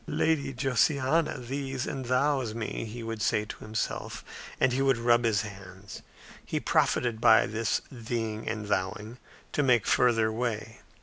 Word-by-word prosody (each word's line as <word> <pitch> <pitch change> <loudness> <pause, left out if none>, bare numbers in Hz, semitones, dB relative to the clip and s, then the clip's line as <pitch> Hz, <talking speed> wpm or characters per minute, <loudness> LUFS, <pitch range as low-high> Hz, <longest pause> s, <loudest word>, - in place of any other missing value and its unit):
"Lady 155 -4 +1
Josiana 135 +4 +1
thees 135 +1 -4
and 130 -1 -4
thous 130 -3 +1
me," 115 0 -4
he 115 +2 -7
would 115 -1 -5
say 105 +1 +1
to - - -9
himself. 110 0 -4 0.3
And 130 - +3
he 135 - 0
would 135 -2 +3
rub 120 0 +3
his 110 -2 +2
hands. 100 -1 -10 0.4
He - - -2
profited 115 -2 +1
by 115 -2 +6
this 115 +1 -1
theeing 115 -3 -3
and 110 -2 -5
thouing 105 +4 -2 0.3
to - - +1
make 125 -5 +3
further 115 -3 +3
way. 110 -1 -3
115 Hz, 150 wpm, -28 LUFS, 110-130 Hz, 0.4 s, by